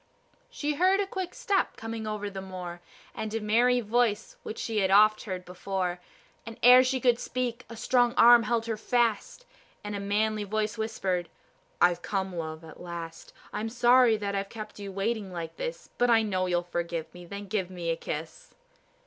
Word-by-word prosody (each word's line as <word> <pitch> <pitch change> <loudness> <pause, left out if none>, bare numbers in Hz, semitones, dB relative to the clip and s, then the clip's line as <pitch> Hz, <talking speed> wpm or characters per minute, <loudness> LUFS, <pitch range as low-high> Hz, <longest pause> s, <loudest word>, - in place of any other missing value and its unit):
She 300 0 -2
heard 370 +6 +3
a 405 - +1
quick 375 -2 -5
step 395 -2 0
coming 225 -1 -5
over 210 -1 -3
the 195 -1 -6
moor, 180 -2 -7 0.3
And 220 - -4
a - - 0
merry 240 +4 +3
voice 225 -1 0
which 220 - -7
she 225 -2 -2
had 190 -2 +2
oft 215 +3 +5
heard 185 -3 -5
before; 180 0 -3 0.4
And 230 0 -9
ere 250 +1 +9
she 260 0 0
could 245 -2 +3
speak 250 -1 -3
a 230 - -8
strong 245 +1 +2
arm 240 +1 +8
held 230 0 0
her 225 -2 -2
fast, 235 - 0 0.4
And 205 0 -4
a - - -3
manly 210 +2 0
voice 215 +1 -2
whispered, 190 -6 -2 0.5
"I've 175 -1 +4
come, 190 -1 -2
love, 160 -1 -5
at 160 -1 -12
last. 170 -2 -8 0.2
I'm 220 +1 -2
sorry 240 0 +5
that 200 -1 -3
I've 195 0 -2
kept 215 -2 -8
you 200 -1 -6
waiting 200 0 -2
like 165 -2 -6
this, - - -5
But 245 - +3
I 225 -1 +5
know 185 -3 0
you'll 175 -1 +1
forgive 170 -2 -4
me, 175 0 -11
then 200 +2 -7
give 190 -2 -2
me 175 -2 -3
a - - 0
kiss." 160 0 -7
210 Hz, 190 wpm, -28 LUFS, 185-235 Hz, 0.5 s, ere